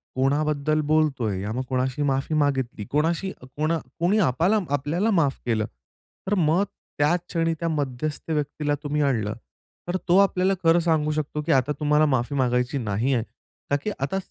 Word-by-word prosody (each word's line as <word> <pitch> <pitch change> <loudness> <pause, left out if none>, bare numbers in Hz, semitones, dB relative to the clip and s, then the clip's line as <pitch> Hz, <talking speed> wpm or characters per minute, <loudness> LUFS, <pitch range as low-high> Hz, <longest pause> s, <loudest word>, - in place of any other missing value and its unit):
कोणाबद्दल 150 +3 +1
बोलतोय, 135 -11 +1
या 105 +2 -3
मग 125 - -2
कोणाशी 130 +1 -1
माफी 135 +2 0
मागितली, 135 -7 0
कोणाशी 165 +6 +1
कोणा 150 +6 -1 0.2
कोणी 180 +5 +2
आपला 175 +5 +3 0.2
आपल्याला 160 +10 0
माफ 140 -4 +1
केलं. 110 -3 +1
तर 65 - -10
मग 170 +3 +3 0.3
त्याच 150 +5 +3
क्षणी 165 -1 +1
त्या 170 - -1
मध्यस्थ 145 +1 -3
व्यक्तीला 150 -1 -1
तुम्ही 150 0 -1
आणलं. 115 -7 +1 0.5
तर 180 - 0
तो 175 +1 +5
आपल्याला 195 -1 +3
खरं 165 +1 +5
सांगू 160 -3 +1
शकतो 150 0 -2
की 155 +2 -1
आता 135 +1 +3
तुम्हाला 150 0 +3
माफी 130 -1 0
मागायची 125 0 +1
नाही 115 +2 0
आहे. 120 -3 +1 0.5
कारण 145 - +2
की 215 - -1
आता 140 +8 -1
145 Hz, 165 wpm, -24 LUFS, 130-160 Hz, 0.5 s, तो